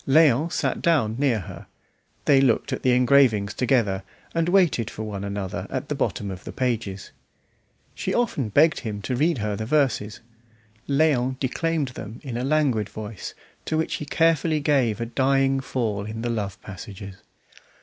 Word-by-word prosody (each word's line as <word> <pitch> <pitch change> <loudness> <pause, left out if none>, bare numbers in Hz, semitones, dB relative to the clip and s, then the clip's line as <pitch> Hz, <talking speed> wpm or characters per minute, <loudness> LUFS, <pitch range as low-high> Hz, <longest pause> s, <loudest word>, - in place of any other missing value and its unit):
Léon 155 +1 +4
sat - - -1
down 140 -11 +2
near 130 -7 +2
her; - - -10 0.6
they 135 -2 +5
looked 125 -5 +2
at - - -3
the 130 - +2
engravings 125 -5 +4
together, 115 -5 +1 0.3
and 165 0 +1
waited 175 - +3
for 110 - -6
one 100 -2 -5
another 100 -2 -4
at - - -4
the - - 0
bottom 100 -1 -2
of 90 -1 -8
the - - -7
pages. 115 -6 -2 0.8
She - - -3
often 150 - 0
begged 155 +9 +4
him 105 -3 -5
to 130 - -2
read 155 +4 +2
her 105 -2 -2
the 110 +1 -4
verses; 130 -7 +1 0.7
Léon 135 -3 +2
declaimed 155 +2 -1
them 115 -2 -8
in 130 -5 -5
a 120 - -2
languid 135 -7 +1
voice, 105 -2 -7 0.3
to 155 - -1
which 160 - -1
he 150 - -6
carefully 165 -1 +2
gave 135 -7 +1
a 115 - -1
dying 135 +2 +2
fall 110 -6 -2
in 110 +1 -5
the 120 - -1
love 100 -5 -3
passages. 100 0 -9
125 Hz, 170 wpm, -24 LUFS, 105-145 Hz, 0.8 s, they